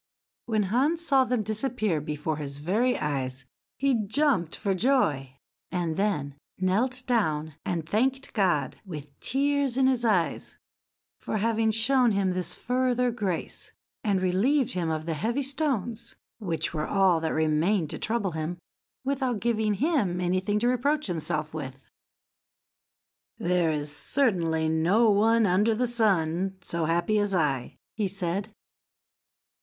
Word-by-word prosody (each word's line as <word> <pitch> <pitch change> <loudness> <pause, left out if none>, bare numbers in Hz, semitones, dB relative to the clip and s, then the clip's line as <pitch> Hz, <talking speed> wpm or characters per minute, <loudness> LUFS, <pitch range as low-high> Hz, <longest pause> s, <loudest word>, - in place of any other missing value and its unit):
When 215 -2 +1
Hans 280 - +1
saw 270 -4 +4
them 250 -3 0
disappear 215 - -1
before 150 +1 -3
his 140 -2 -6
very 215 - +1
eyes 135 -3 -3 0.3
he 275 0 +2
jumped 230 - +1
for 200 -2 -1
joy, 160 - +1 0.3
and 175 -3 -1
then 155 -9 -1 0.2
knelt 235 +8 0
down 160 -11 0
and 165 -3 -3
thanked 265 +7 0
God, 175 - +1
with 150 -7 -8
tears 280 -1 0
in 265 - +4
his 260 -2 +2
eyes, 190 -8 0 0.6
for - - -3
having 225 +1 +1
shown 240 +2 +3
him 195 -2 +1
this 180 -2 -3
further 250 0 +1
grace, 200 -7 -4 0.3
and 195 -3 +1
relieved 230 +9 +2
him 175 -3 -1
of 155 0 -2
the 165 - -1
heavy 235 - -1
stones 265 -6 -2 0.2
(which 165 -7 -2
were 155 -1 -2
all 190 -4 +3
that 160 0 -2
remained 160 +2 +1
to - - -5
trouble 220 -4 -1
him) 160 +2 -4 0.5
without 260 -4 0
giving 220 -2 +1
him 250 - +1
anything 185 +3 0
to 235 +3 +1
reproach 280 +5 +1
himself 155 -4 -2
with. 135 -3 -7 1.5
"There 175 -1 +1
is 150 -1 -3
certainly 165 - +1
no 180 +8 +3
one 225 +2 +4
under 205 +4 +3
the 250 +3 +1
sun 190 -5 +1
so 170 -2 -2
happy 170 +6 +1
as 205 -2 0
I," 140 -7 0 0.2
he 210 -2 -1
said. 190 0 -2
195 Hz, 140 wpm, -27 LUFS, 160-240 Hz, 1.5 s, saw